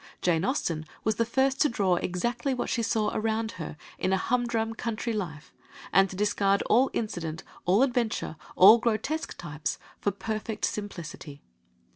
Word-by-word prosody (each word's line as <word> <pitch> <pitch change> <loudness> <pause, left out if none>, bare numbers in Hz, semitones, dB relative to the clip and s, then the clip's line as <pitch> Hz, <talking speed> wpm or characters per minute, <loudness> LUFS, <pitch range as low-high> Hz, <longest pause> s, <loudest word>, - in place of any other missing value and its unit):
Jane 170 -2 +2
Austen 170 - -1 0.2
was 220 -1 +1
the 230 - +2
first 265 +2 +1
to 300 - +5
draw 190 -6 +2
exactly 240 +10 -1
what 250 - -2
she 235 - +1
saw 220 -2 +1
around 220 +1 -1
her 155 - -6 0.2
in 185 - 0
a 190 - +3
humdrum 235 0 0
country 230 0 -3
life, 165 -8 -5 0.4
and 195 0 +5
to 190 - -7
discard 200 0 +2
all 255 +4 +4
incident, 165 -7 -3 0.2
all 195 +8 +5
adventure, 240 -10 0 0.2
all 210 +5 +9
grotesque 235 +7 -1
types, 150 -3 -4 0.2
for - - +1
perfect 215 +2 -3
simplicity. 170 -8 -6
215 Hz, 155 wpm, -28 LUFS, 180-235 Hz, 0.4 s, all